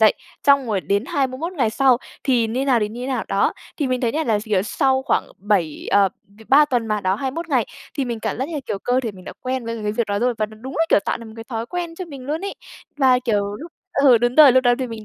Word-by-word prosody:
dậy 215 -1 +6 0.3
xong 280 -2 +5
rồi 205 -4 0
đến 200 +5 0
21 280 +6 -2
ngày 250 -10 +1
sau 260 0 +3 0.3
thì 245 -4 +2
như 220 - -5
thế - - 0
nào 250 -4 +3
thì 210 - 0
như 230 +3 -8
thế 250 - -4
nào, 265 -2 -2
đó. - - +2 0.2
Thì 290 - -1
mình 255 -1 -1
thấy 235 -2 0
nha, 315 +1 -1
là 220 -4 +2
s 205 - -7
kiểu, 205 -4 +1
sau 265 +4 +1
khoảng - - +1
7, 190 -6 -1
ờ 200 -1 +5 0.2
v 205 +2 -22
3 290 +3 +7
tuần 245 -5 -1
mà, 215 -1 -1
đó 190 0 +1
21 275 +9 -4
ngày 250 -7 +1 0.3
thì 275 -3 -1
mình 235 -2 -4
cảm - - -3
giác 265 +4 -2
như, 305 -4 -4
kiểu, 195 - -3
cơ 245 +5 +1
thể 230 -5 -4
mình 185 -1 -14
đã - - -7
quen 255 -1 -3
với 230 -1 -4
cái 210 0 -1
việc 235 0 -1
đó 200 0 -1
rồi. 245 +1 +1
Và 215 - +1
nó 215 0 -14
đúng 265 +2 -7
là, 325 - +4
kiểu, - - +5
tạo - - -1
được 230 - -10
một 220 - -11
cái 225 - -8
thói 230 -1 -4
quen 345 0 -4
cho 365 +2 -6
mình 275 -6 -10
luôn 310 +4 -2
ấy. 400 - -4 0.4
Và, 260 -3 +4
kiểu, 205 -4 -1
lúc 330 +3 -10 0.2
ừ, 270 -4 +5
đúng 240 +1 +1
rồi, 295 -5 +8
lúc 260 0 +3
đó 245 0 +5
thì 260 - -2
mình 225 -2 -8
245 Hz, 300 wpm, -21 LUFS, 215-270 Hz, 0.4 s, rồi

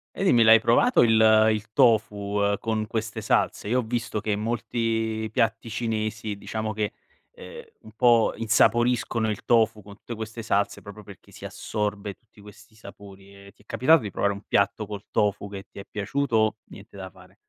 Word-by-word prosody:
E - - -3
dimmi 120 -11 +5
l'hai 110 0 +7
provato 120 - +3
il 110 -1 +5
il 110 0 -6
tofu, 105 -5 +2
ehm, 100 0 +1
con 110 -1 -2
queste 110 0 -4
salse? - - 0
io 125 +3 +2
ho - - +1
visto 115 -2 -3
che 105 0 -1
molti 115 0 -2
piatti 115 +1 -1
cinesi 110 -2 -3
diciamo 110 +2 -5
che, 105 0 -2 0.4
ehm, 475 0 -11 0.2
un 110 - -13
po' 120 -1 +3
insaporiscono 115 +1 +1
il 105 - -5
tofu 110 -2 +2
con 100 0 -13
tutte 120 - -9
queste 110 +1 -7
salse, 100 -2 -1
proprio 100 0 -12
perché 100 -1 -15
si - - -11
assorbe 105 -2 -4
tutti 110 -2 -23
questi 105 +1 -16
sapori 100 -2 -14
e 100 0 -15
ti - - -26
è - - -43
capitato 150 +8 +3
di 105 - -6
provare 100 +2 0
un 100 - -9
piatto 100 +2 0
col 105 -1 -8
tofu 100 -1 0
che 100 -1 -9
ti - - -11
è 100 - -9
piaciuto? 110 0 0
Niente - - -14
da 95 -1 -7
fare. 95 0 -19
110 Hz, 185 wpm, -25 LUFS, 100-115 Hz, 0.4 s, l'hai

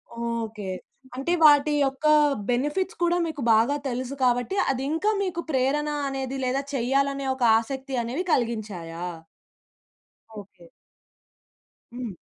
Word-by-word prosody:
Okay. 230 -3 -4 0.5
అంటే 275 +7 -1
వాటి 295 0 +6
యొక్క 270 +3 -4 0.4
బెనిఫిట్స్ 295 +10 -1
కూడా 345 0 +2
మీకు 310 -3 -5
బాగా 230 +6 +3
తెలుసు 255 +2 -3
కాబట్టి, 245 +9 +1 0.2
అది 265 0 -3
ఇంకా 370 +7 +1
మీకు 345 -3 -2
ప్రేరణ 280 +3 +1 0.2
అనేది, 270 0 -4
లేదా 260 +2 0
చేయాలనే 275 +2 0
ఒక 260 - -3 0.2
ఆసక్తి 265 +3 -5
అనేవి 260 +10 -3
కలిగించాయా? 205 -8 -2 1.4
ఓకే. 185 -4 -18 1.3
హ్మ్. 240 -6 -6
265 Hz, 110 wpm, -25 LUFS, 235-285 Hz, 1.4 s, వాటి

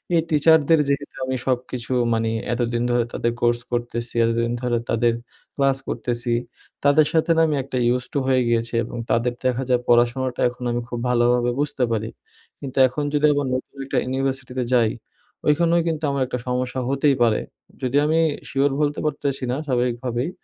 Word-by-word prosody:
এই 165 - +4
টিচারদের 160 0 +4
যেহেতু 140 +1 -2
আমি 130 0 -2
সবকিছু 125 -1 -2 0.2
মানে 115 0 0 0.2
এতদিন 120 0 -1
ধরে 120 -1 +2
তাদের 120 - 0
কোর্স 120 0 +2
করতেছি, 120 0 -2
এতদিন 115 +1 0
ধরে 120 -1 0
তাদের 115 0 +2 0.4
ক্লাস 135 -1 +2
করতেছি, 120 0 -2 0.5
তাদের 145 +1 +5
সাথে 165 +1 +2
না - - +5
আমি 150 - 0
একটা 130 -1 -4 0.2
used 125 - -5
to 145 - +1
হয়ে 130 -1 +3
গিয়েছি। 115 0 0
এবং 120 - -7
তাদের 120 +1 +1
দেখা 130 +1 +1
যায় 125 -1 +3
পড়াশোনাটা 120 +1 +2
এখন 125 +1 -10
আমি 120 0 -1
খুব 120 - -4
ভালোভাবে 120 0 +2
বুঝতে 145 -3 -1
পারি। 110 -1 -1 0.5
কিন্তু 135 -1 -8
এখন 145 +4 -4
যদি 150 0 +3
আবার 145 -1 -1
নতুন 130 +2 -4
একটা 135 - -2
ইউনিভার্সিটিতে 130 -1 -2
যাই, 115 -3 +4 0.6
ওইখানেও 170 +3 +3
কিন্তু 160 -1 -2
আমার 140 -1 -1
একটা 125 -1 -3
সমস্যা 125 +1 -1
হতেই 140 0 +2
পারে। 110 -2 +2 0.4
যদি 130 +2 0
আমি 160 +2 +2 0.3
শিওর 140 0 +1
বলতে 145 0 0
পারতেছি 140 -2 -2
না, 125 - 0
স্বাভাবিকভাবেই। 125 +1 -1
125 Hz, 170 wpm, -22 LUFS, 120-140 Hz, 0.6 s, তাদের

